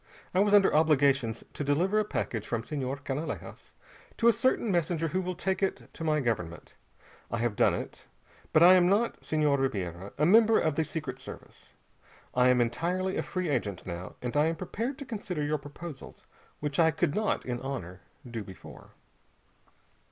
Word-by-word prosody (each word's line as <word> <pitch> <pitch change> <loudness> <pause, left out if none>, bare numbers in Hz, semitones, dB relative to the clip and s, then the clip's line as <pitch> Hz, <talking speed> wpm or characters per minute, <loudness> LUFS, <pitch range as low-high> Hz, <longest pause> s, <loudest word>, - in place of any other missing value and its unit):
I 185 - +2
was 205 +1 +5
under 200 -2 +5
obligations 140 -6 +3
to - - -4
deliver 175 +9 +2
a - - +2
package 110 - -3
from 115 -1 -2
Senhor 135 +1 -3
Canalejas 145 +4 -5 0.5
to 235 - +3
a 235 - +7
certain 235 -2 +1
messenger 165 -2 0
who 185 +4 0
will 180 0 -3
take 190 +3 -1
it 195 - -2
to 165 - -7
my 155 -2 +2
government. 90 - -3 0.6
I 115 - -2
have 115 -2 -1
done - - +3
it. - - -7 0.4
But 155 - +6
I 180 +2 +9
am 180 -1 +5
not, 215 +4 +1
Senhor 150 -3 +1
Ribiera, 95 -7 -3
a 150 - +3
member 220 +4 +6
of 160 - +1
the 160 - +1
Secret 155 +1 -5
Service. - - -12 0.6
I 125 0 +4
am 125 -1 +4
entirely 180 +10 -1
a - - 0
free 185 -3 -3
agent 105 - -2
now, 90 0 -6
and 125 +2 -3
I 150 +2 +4
am 165 - 0
prepared 225 - -4
to 280 - -7
consider 200 - -4
your 150 +1 0
proposals, 145 +1 -10 0.4
which 145 +1 -2
I 165 -1 +6
could 160 -1 0
not 215 +2 0
in 125 -1 -3
honor 95 -10 -5 0.3
do 115 -3 -5
before." 95 -3 -13
150 Hz, 180 wpm, -29 LUFS, 125-185 Hz, 0.6 s, I